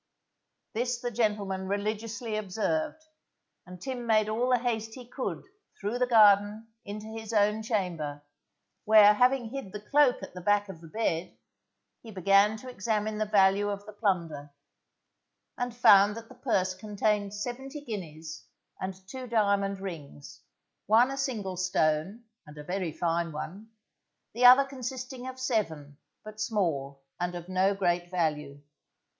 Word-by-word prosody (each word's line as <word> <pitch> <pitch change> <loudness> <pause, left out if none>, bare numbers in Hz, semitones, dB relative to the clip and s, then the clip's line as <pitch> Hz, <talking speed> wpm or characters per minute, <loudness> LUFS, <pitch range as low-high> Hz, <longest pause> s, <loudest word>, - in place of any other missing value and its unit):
This 245 +1 -1
the 245 0 -3
gentleman 205 -4 -1
religiously 215 +3 -3
observed, 260 +11 -2 0.6
and 180 0 -10
Tim 245 +1 -5
made 215 -1 +3
all 235 +4 0
the 250 - +4
haste 225 -2 -2
he 250 -2 -11
could 255 +1 -4 0.4
through 210 +5 -2
the 250 - +2
garden 210 -1 +5
into 210 +1 -7
his 220 0 -7
own 210 +1 +2
chamber, 170 -10 -3 0.6
where 210 -1 +7
having 250 +1 +2
hid 270 -8 -6
the 210 - -6
cloak 270 +4 +3
at - - -8
the 180 - -8
back 205 +2 +2
of 170 -4 -9
the 165 - -11
bed, 170 -2 -2 0.6
he 230 - -12
began 200 +2 +3
to 255 - -11
examine 215 -2 -2
the 215 - 0
value 200 0 +3
of 200 0 -5
the 210 - -10
plunder, 170 -8 -1 1.1
and 245 -1 -4
found 205 -2 +6
that 230 0 -10
the - - -12
purse 195 -8 0
contained 205 +1 -1
seventy 265 +7 -6
guineas 160 - -7 0.3
and 190 0 -6
two 255 +3 -7
diamond 200 -3 +1
rings, 155 - -9 0.5
one 235 +5 +5
a - - -3
single 215 -9 -3
stone 185 +3 0 0.2
and 150 0 -13
a 150 - -8
very 180 0 -3
fine 170 +1 -1
one, 190 +8 -7 0.6
the 245 +3 +2
other 255 +3 +9
consisting 255 -1 -6
of 260 0 -7
seven, 160 - -2 0.2
but 215 0 -9
small 140 - -1 0.2
and 180 0 -2
of 175 0 -7
no 185 +2 +2
great 175 -2 0
value. 150 -5 -2
210 Hz, 150 wpm, -28 LUFS, 185-235 Hz, 1.1 s, other